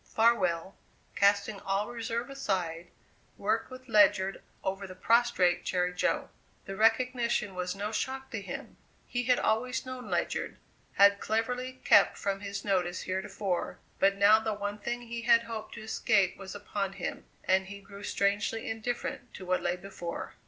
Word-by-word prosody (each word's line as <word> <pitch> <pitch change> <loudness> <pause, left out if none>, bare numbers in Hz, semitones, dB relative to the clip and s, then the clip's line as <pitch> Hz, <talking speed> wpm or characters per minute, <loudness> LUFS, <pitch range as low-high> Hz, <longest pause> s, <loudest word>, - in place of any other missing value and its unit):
Farwell, 195 -6 +2 0.4
casting 200 0 +3
all 195 +2 -1
reserve 235 +2 -3
aside, 180 -10 -2 0.5
worked 215 +3 0
with 255 0 -11
Ledyard 205 -3 +4 0.2
over 195 +1 -3
the 185 - -10
prostrate 185 -5 +3
Jerry 180 -1 0
Jo. - - 0 0.3
The 195 - -6
recognition 235 -1 +2
was 180 +1 -3
no 205 +2 -3
shock 265 +4 -3
to 220 - -3
him; 185 -3 -7 0.3
he 245 0 -2
had 250 0 +4
always 250 +4 0
known 255 -1 -7
Ledyard; - - -1 0.4
had 200 0 +6
cleverly 250 +4 -2
kept - - +6
from 195 -1 -1
his 200 0 -5
notice 185 -3 0
heretofore, 190 -1 -2 0.2
but 195 0 +4
now 205 +2 +7
the 220 -1 -2
one 205 +1 -4
thing 240 +2 -3
he 235 0 -5
had 235 0 +5
hoped 225 -2 -6
to 225 - -8
escape 195 -3 +2
was 195 0 -8
upon 200 -1 -3
him, 195 - -5 0.2
and 190 0 +2
he 200 +1 -8
grew 200 0 -12
strangely 210 +2 0
indifferent 235 +2 -4
to 185 - -8
what 185 0 +1
lay 175 0 0
before. 180 -2 -6
205 Hz, 160 wpm, -30 LUFS, 190-230 Hz, 0.5 s, now